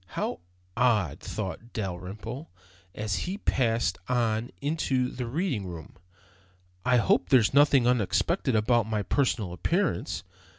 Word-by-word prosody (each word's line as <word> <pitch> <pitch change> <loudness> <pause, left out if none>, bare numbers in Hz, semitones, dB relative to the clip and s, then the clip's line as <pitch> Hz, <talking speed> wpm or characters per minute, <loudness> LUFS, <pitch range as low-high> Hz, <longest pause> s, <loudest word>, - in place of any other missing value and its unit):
"How - - -1 0.4
odd," 110 - +2
thought 110 +3 -6
Dalrymple, 105 - -5 0.5
as 105 -2 -2
he 195 - -3
passed 115 - +1
on 120 -1 +1
into 140 -4 0
the 125 -2 -4
reading 130 - -1
room, 85 -3 -8 0.9
"I 125 0 +4
hope 100 -5 +2
there's 120 -3 +5
nothing 140 -3 +5
unexpected 125 - +1
about 110 +1 +3
my 105 -2 0
personal 110 -6 0
appearance." 170 - -1
120 Hz, 120 wpm, -28 LUFS, 105-130 Hz, 0.9 s, there's